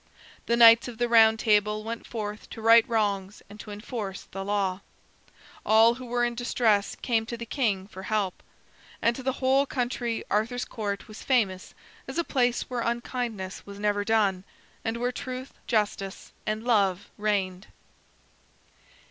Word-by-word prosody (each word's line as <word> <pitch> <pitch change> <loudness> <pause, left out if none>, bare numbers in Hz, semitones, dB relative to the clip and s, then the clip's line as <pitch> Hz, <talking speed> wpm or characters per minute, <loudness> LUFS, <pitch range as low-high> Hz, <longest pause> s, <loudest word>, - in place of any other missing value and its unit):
The 235 - +2
Knights 230 0 +8
of 240 -2 -8
the 240 +1 +1
Round 225 -1 +6
Table 210 -1 +2
went 225 +1 -6
forth 210 -2 -6
to - - -9
right 230 0 +7
wrongs 205 -3 -1
and 210 - -12
to 210 - -9
enforce 205 -2 -6
the 195 0 -7
law. 195 -2 -1 0.8
All 225 +2 +6
who 250 +1 -9
were 240 0 +1
in 240 - -1
distress 230 -3 +1
came 230 -3 +1
to 235 - -5
the 235 - -6
king 215 -7 -1
for 190 -2 -10
help. 200 -2 -2 0.6
And 235 +1 +2
to 260 - -6
the 265 0 -1
whole 270 +2 +2
country 240 -3 -2
Arthur's 230 +4 0
Court 205 -2 -4
was 215 -1 -10
famous 200 -8 0 0.3
as - - -6
a 340 - +2
place 245 -5 +1
where 250 -2 -4
unkindness 235 -5 -3
was 200 0 -9
never 205 0 0
done, 200 -4 +1 0.4
and 225 0 -2
where 245 +1 -1
truth, 255 +1 -6
justice, 205 -4 -1 0.2
and 215 +1 -1
love 200 -6 +1
reigned. 195 -2 -1
220 Hz, 160 wpm, -27 LUFS, 205-240 Hz, 0.8 s, Knights